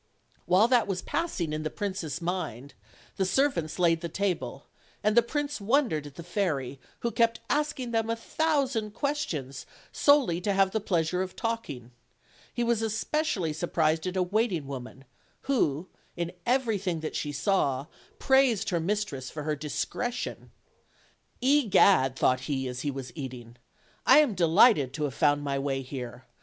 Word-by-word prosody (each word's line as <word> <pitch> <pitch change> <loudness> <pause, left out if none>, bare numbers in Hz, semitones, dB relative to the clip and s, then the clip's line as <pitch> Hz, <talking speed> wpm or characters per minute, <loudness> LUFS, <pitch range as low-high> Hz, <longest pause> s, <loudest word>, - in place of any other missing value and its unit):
While 185 +6 +5
that 245 -3 +4
was 190 -2 -2
passing 185 - -2
in 155 - -2
the 155 - -2
prince's 180 -4 -4
mind, 140 -7 -4 0.4
the 195 - +2
serv 270 +10 +2
ants 155 -1 -6
laid 165 -2 +3
the 170 - -4
table; 155 -9 -2 0.4
and 215 +1 +2
the 235 - +8
prince 290 +1 -3
wondered 210 - +1
at 140 - -13
the 170 - -8
fairy, 155 -8 -2 0.2
who 235 - -1
kept 230 -1 +2
asking 290 -5 -1
them 225 -1 0
a 230 - +1
thousand 260 -5 -1
questions, 165 - -3 0.2
solely 270 - +3
to 200 +2 0
have 195 0 +3
the 220 - 0
pleasure 180 -3 0
of 185 0 -4
talking: 150 - -4 0.6
he 240 - -2
was 235 -1 +1
especially 220 - -1
sur 165 +3 -3
prised 160 +1 +1
at 185 +1 -3
a 185 - +3
waiting 195 -4 0
woman, 135 0 -8 0.4
who, 185 - 0 0.3
in 170 0 -2 0.2
everything 215 -10 0
that 155 - -4
she 150 - -2
saw, 140 -3 0 0.3
praised 265 -7 +3
her 170 - +1
mistress 165 -8 -2
for 150 - -6
her 155 0 -1
discretion. 235 - -4 0.9
"Egad!" 200 - +4
thought 130 -1 +2
he 135 -2 -1
as 125 0 -5
he 145 - -1
was 135 -3 -6
eating, 125 -5 -8 0.5
"I - - +8
am 300 -7 +5
delighted 170 - +4
to 150 - -3
have 145 -3 -1
found 145 +1 +2
my 140 -1 -1
way 135 -1 -2
here. 125 -2 -7
180 Hz, 165 wpm, -28 LUFS, 145-230 Hz, 0.9 s, the